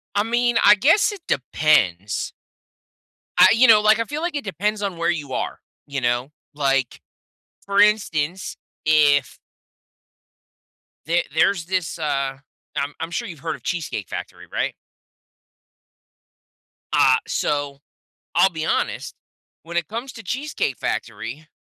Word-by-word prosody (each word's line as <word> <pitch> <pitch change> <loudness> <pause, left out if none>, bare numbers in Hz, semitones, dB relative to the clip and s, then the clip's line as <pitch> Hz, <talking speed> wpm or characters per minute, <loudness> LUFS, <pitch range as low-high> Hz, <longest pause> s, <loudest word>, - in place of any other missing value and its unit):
I 205 - +3
mean, 240 +1 +1
I 205 +1 +8
guess 330 - +4
it 405 - -9
depends. 105 - +1 1.1
I - - +9
You 245 +3 +5
know, 215 -2 +7
like, 215 +1 +4
I 230 - 0
feel 295 +5 -5
like 345 -1 -2
it 290 - -2
depends 210 +2 -2
on 195 -4 -3
where 170 +1 0
you 145 -5 -5
are, - - -3 0.3
you 140 -1 -4
know? 120 +3 0 0.2
Like, 135 -3 0 0.6
for 200 0 +1
instance, 190 -5 +1 0.3
if 145 -3 +3 1.7
the 170 +2 +2
there's 165 +2 +2
this, 185 -2 -2
uh, 135 -3 -1 0.4
I'm 140 +1 -2
I'm 165 +1 -5
sure 235 +6 -3
you've 165 -6 -9
heard 160 +2 -3
of - - -16
Cheesecake 160 - -3
Factory, - - -7
right? - - -1 2.2
Ah, 130 -1 +5
so, 145 -1 -1 0.6
I'll 195 - +5
be 160 -3 -4
honest, - - -1 0.5
when 170 +1 -5
it 170 - 0
comes 235 +5 -5
to 225 - -10
Cheesecake 250 - -2
Factory, 120 +7 -4
165 Hz, 135 wpm, -22 LUFS, 140-210 Hz, 2.2 s, I